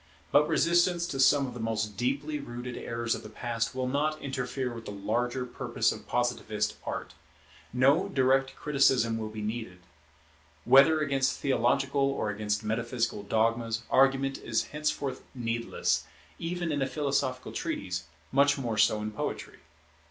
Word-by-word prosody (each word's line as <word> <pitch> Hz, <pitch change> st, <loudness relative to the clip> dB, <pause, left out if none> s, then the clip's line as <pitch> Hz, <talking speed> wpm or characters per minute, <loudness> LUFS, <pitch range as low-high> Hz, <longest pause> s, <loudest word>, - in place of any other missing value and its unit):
But 150 Hz, +1 st, +5 dB
resistance 170 Hz, +2 st, +3 dB
to 135 Hz, -, -4 dB
some 140 Hz, +1 st, +5 dB
of 125 Hz, -, -6 dB
the 120 Hz, -, -8 dB
most 110 Hz, -2 st, -2 dB
deeply 140 Hz, +7 st, -1 dB
rooted 120 Hz, -2 st, -6 dB
errors 115 Hz, 0 st, -2 dB
of -, -, -4 dB
the 105 Hz, -, -10 dB
Past 115 Hz, +2 st, -3 dB
will 130 Hz, -1 st, -1 dB
not 150 Hz, +4 st, 0 dB
interfere 130 Hz, -2 st, -3 dB
with 115 Hz, -1 st, -9 dB
the -, -, -6 dB
larger 120 Hz, +5 st, -1 dB
purpose 125 Hz, -, 0 dB
of -, -, -8 dB
Positivist 120 Hz, -3 st, -1 dB
Art. -, -, -4 dB, 0.6 s
No 140 Hz, +10 st, +3 dB
direct 135 Hz, -3 st, +2 dB
criticism 130 Hz, -6 st, +2 dB
will 110 Hz, -1 st, -4 dB
be 110 Hz, 0 st, -6 dB
needed. 110 Hz, -4 st, -4 dB, 0.9 s
Whether 155 Hz, +4 st, +6 dB
against 135 Hz, -2 st, +1 dB
theological 140 Hz, +1 st, +1 dB
or 110 Hz, -6 st, -1 dB
against 105 Hz, +1 st, -2 dB
metaphysical 115 Hz, 0 st, -1 dB
dogmas, 115 Hz, +2 st, 0 dB
argument 135 Hz, 0 st, +3 dB
is 115 Hz, -1 st, 0 dB
henceforth 145 Hz, -3 st, -2 dB
needless, 115 Hz, -1 st, -1 dB, 0.3 s
even 170 Hz, 0 st, -2 dB
in 145 Hz, -1 st, -1 dB
a 135 Hz, -, +1 dB
philosophical 140 Hz, -3 st, -1 dB
treatise, 90 Hz, -2 st, -3 dB, 0.3 s
much 140 Hz, +2 st, +4 dB
more 115 Hz, -5 st, -2 dB
so 105 Hz, 0 st, +4 dB
in 110 Hz, -, -3 dB
poetry. 105 Hz, -, -5 dB
125 Hz, 150 wpm, -29 LUFS, 115-140 Hz, 0.9 s, Whether